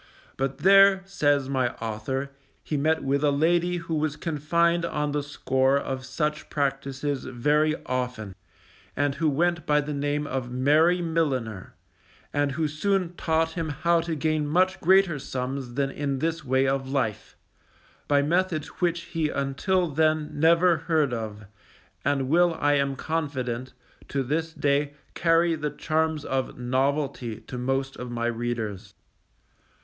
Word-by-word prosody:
But 135 0 -2
there, 195 +3 +6
says 145 -8 +1
my 130 -3 0
author, 115 +5 -4 0.3
he 150 - -3
met 155 +2 +1
with 140 +1 0
a 150 - +4
lady 175 +5 +2
who 165 -1 -5
was 155 -1 0
confined 170 +2 +1
on 150 -3 -1
the 145 0 0
score 135 -1 +1
of 130 -2 -4
such 150 +3 -2
practices 140 0 -2
very 150 +5 +1
often, 125 -6 -3 0.6
and 145 0 +1
who 160 +2 +1
went 170 +3 0
by 150 0 +4
the 150 +1 -3
name 145 +1 -1
of 130 -3 -3
Mary 155 +8 +3
Milliner; 130 - -2 0.6
and 145 -1 +1
who 155 +2 0
soon 180 +3 0
taught 160 -1 0
him 165 -1 -3
how 170 +4 +2
to 165 -1 -3
gain 155 0 0
much 185 +5 +2
greater 185 -3 +4
sums 130 -1 -4
than 135 0 0
in 140 -1 -2
this 165 +3 -2
way 130 0 +2
of 135 0 -1
life, 110 -6 -2 0.7
by 145 -1 +3
methods 165 -1 0
which 170 -1 +1
he 160 -3 -2
until 150 +7 0
then 155 0 +1
never 170 +3 +4
heard 155 -4 +1
of, 110 -2 -5 0.6
and 140 -2 0
will 170 +3 +3
I 145 0 +3
am 140 -1 +1
confident, 130 -5 -3 0.3
to 135 -1 -1
this 160 +5 -1
day 145 -1 0 0.2
carry 165 0 +3
the 150 -2 -2
charms 160 0 -1
of 135 -1 -2
novelty 130 -2 -1
to 125 - -7
most 135 +2 -1
of 125 - -6
my 120 -1 -2
readers. 115 -4 -3
145 Hz, 150 wpm, -26 LUFS, 135-160 Hz, 0.7 s, there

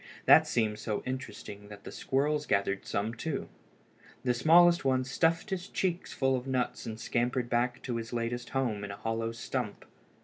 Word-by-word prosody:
That - - +8
seemed 110 -3 0
so 105 -1 -2
interesting 105 -5 -6
that 105 -1 -11
the - - -8
squirrels 145 +2 0
gathered 100 0 0
some 105 +3 -1
too. 140 +5 -4 0.7
The 125 - +2
smallest 170 +7 +6
one 130 -1 +2
stuffed 165 +8 +1
his 185 0 -2
cheeks 180 -2 -1
full 135 -1 +1
of 125 +1 -4
nuts 125 -2 -1
and 110 0 -5
scampered 120 +1 -1
back 120 +1 0
to 120 -3 -2
his 115 0 -5
latest 120 0 -2
home 120 -7 -1
in 100 - -5
a 100 - -6
hollow 115 0 -2
stump. 115 - -4
125 Hz, 175 wpm, -30 LUFS, 115-135 Hz, 0.7 s, That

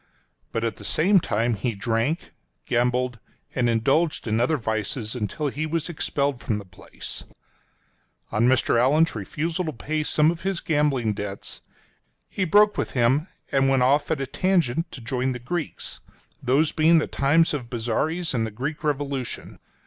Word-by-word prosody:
But 115 - -2
at 115 - -1
the - - -11
same 190 +5 +4
time 115 -5 0
he 115 +2 -2
drank, 115 +9 -1 0.3
gambled, 125 0 +1 0.3
and 120 -2 +1
indulged 140 +8 +1
in 110 0 +1
other 130 +6 +2
vices 110 -1 -2
until 125 +5 -2
he 150 +4 -3
was 165 +1 -2
expelled 140 -5 -1
from 105 - -1
the 105 - -7
place. 90 -1 -8 1.1
On 110 +3 +3
Mr. 125 -2 +3
Allan's 155 +6 +4
refusal 160 - -2
to 155 - -2
pay 155 +4 -2
some 155 +1 +3
of 170 - -7
his 190 -2 -1
gambling 145 -8 +1
debts, 100 -1 -6 0.7
he 190 - -1
broke 210 +4 +5
with - - -2
him 130 +6 +2 0.2
and 135 -1 +3
went 135 -2 +3
off 145 +3 +3
at 160 -3 0
a 135 - -1
tangent 165 0 +1
to 130 - -9
join 130 +3 -1
the - - -4
Greeks 155 +6 -5 0.2
— - - -35
those 140 +5 +2
being 160 +2 +5
the 155 - +2
times 160 +5 +3
of 125 -5 -4
Bozzaris 140 +9 -1
and 115 -3 0
the - - -4
Greek 135 +9 -4
Revolution. 140 -4 -3
135 Hz, 170 wpm, -25 LUFS, 120-155 Hz, 1.1 s, broke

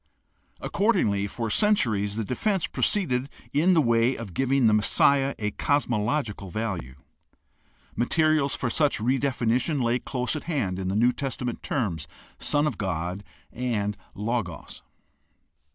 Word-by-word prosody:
Accordingly, 110 - +1
for 115 +2 -4
centuries 110 - +2
the 110 - -1
defense 190 - 0
proceeded 135 -10 0 0.2
in 170 +6 +4
the 160 - +5
way 120 +1 +3
of 110 -6 -8
giving 135 +2 +2
the 110 - +5
Messiah 135 +6 +3
a 105 -1 -2
cos 145 +6 +1
mological 110 -3 -2
value. 90 - -4 1.0
Materials 155 +3 +2
for 125 - -2
such 150 +1 +2
redefinition 125 +3 0
lay 120 0 +1
close 125 +2 -2
at 155 - -5
hand 110 - -1
in 95 - -3
the 95 - -1
New 120 +4 +4
Testament 125 -3 -4
terms 105 - -2 0.3
"Son 145 0 +2
of 145 -9 -2
God" 90 0 -3 0.3
and 110 -4 -1 0.2
"Logos." 105 -6 -4
120 Hz, 135 wpm, -26 LUFS, 105-140 Hz, 1.0 s, the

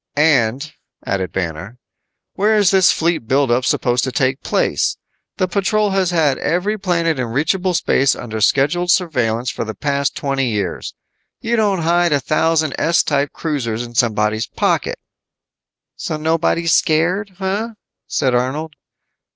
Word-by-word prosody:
"And," 140 -1 +2 0.3
added 95 -3 -2
Banner, 90 +5 -4 0.6
"where 215 +2 +2
is 200 -4 +4
this 190 -2 +5
fleet 160 -8 -1
build 135 0 +2
up 120 +2 +2
supposed 125 -1 +1
to 130 - -3
take 130 0 0
place? - - 0 0.4
The 185 - +1
patrol 200 +3 0
has 190 -2 +1
had 155 -6 +1
every 180 +6 0
planet 170 -5 0
in 125 - -1
reachable 170 +9 0
space 135 -4 +2
under 110 -2 -6
scheduled 150 - +2
surveillance 125 -10 +1
for - - -4
the 110 -1 -6
past 140 +4 -1
twenty 135 -2 -1
years. 100 -5 -3 0.4
You 235 +1 -1
don't 200 -6 +1
hide 170 0 +2
a 145 - +2
thousand 155 0 +1
S 170 +1 +3
type 145 -1 0
cruisers 120 -8 -3
in 120 0 -10
somebody's 110 -2 +1
pocket." - - -1 1.0
"So 155 - -4
nobody's 165 +1 +1
scared, 180 +5 +1
huh?" 200 +4 -3 0.3
said 130 -2 0
Arnold. 140 +6 -1
150 Hz, 145 wpm, -18 LUFS, 125-175 Hz, 1.0 s, this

